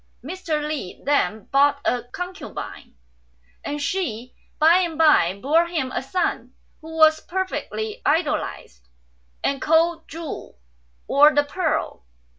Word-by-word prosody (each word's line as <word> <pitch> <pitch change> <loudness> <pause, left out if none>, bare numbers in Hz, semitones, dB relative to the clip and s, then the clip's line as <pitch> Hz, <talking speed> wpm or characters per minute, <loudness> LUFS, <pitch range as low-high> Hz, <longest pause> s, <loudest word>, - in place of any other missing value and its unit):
Mr. 310 -1 -3
Li 295 -12 -5
then 220 -8 +1
bought 280 +1 +4
a 245 - +1
concubine, 360 +8 -8 0.7
and 295 - -4
she 280 - -3 0.2
by 320 +3 +6
and 345 -4 -1
by 300 - +4
bore 320 +8 +3
him 305 -7 -2
a - - -2
son, 275 +8 -2 0.3
who 320 +1 -9
was 315 0 +6
perfectly 420 +5 -4
idolised, 295 - -1 0.6
and 275 -1 0
called 325 +1 +2
Chu, 325 - -7 0.5
or 295 +1 +6
the 290 - +4
Pearl. 315 - -2
310 Hz, 120 wpm, -23 LUFS, 280-340 Hz, 0.7 s, by